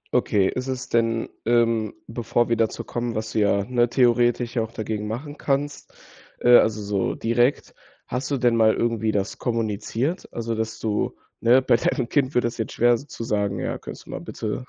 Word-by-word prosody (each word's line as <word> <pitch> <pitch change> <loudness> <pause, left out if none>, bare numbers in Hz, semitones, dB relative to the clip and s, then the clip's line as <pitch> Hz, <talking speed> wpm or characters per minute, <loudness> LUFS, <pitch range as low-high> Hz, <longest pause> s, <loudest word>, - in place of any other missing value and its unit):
Okay, 100 -2 +3
ist 125 +5 -3
es 130 0 -4
denn, 115 -1 +1 0.2
ähm 115 -2 +2
bevor 115 +1 0
wir 115 - +2
dazu 115 -1 -1
kommen, 120 -1 -3
was 110 0 -3
du 110 - 0
ja, 100 -1 +2
ne, 120 -1 +2
theoretisch 120 -1 +2
ja 115 - +2
auch 110 0 -4
dagegen 105 -1 -4
machen 145 +7 -6
kannst, 145 +1 -2 0.5
äh, 120 - +3
also, 110 -1 +2
so 100 -1 -1
direkt. 120 +4 +1 0.3
Hast 125 +2 -3
du 140 - 0
denn 120 -1 +3
mal 110 -1 +4
irgendwie 115 -2 0
das 100 -2 -2
kommuniziert? 115 - -2
Also, 115 -1 -3
dass 110 0 -3
du, 105 -2 -1 0.2
ne 125 +3 +5
bei 120 - +4
deinem 115 - -1
Kind 140 -2 +1
wird 125 - +3
das 120 0 -3
jetzt 110 - -3
schwer 120 0 +4
so 140 - -12
zu 115 - -7
sagen: 100 -3 -1
„Ja, - - -3
könntest - - -9
du - - -11
mal - - -4
bitte 110 +4 -5
115 Hz, 200 wpm, -24 LUFS, 110-120 Hz, 0.5 s, ne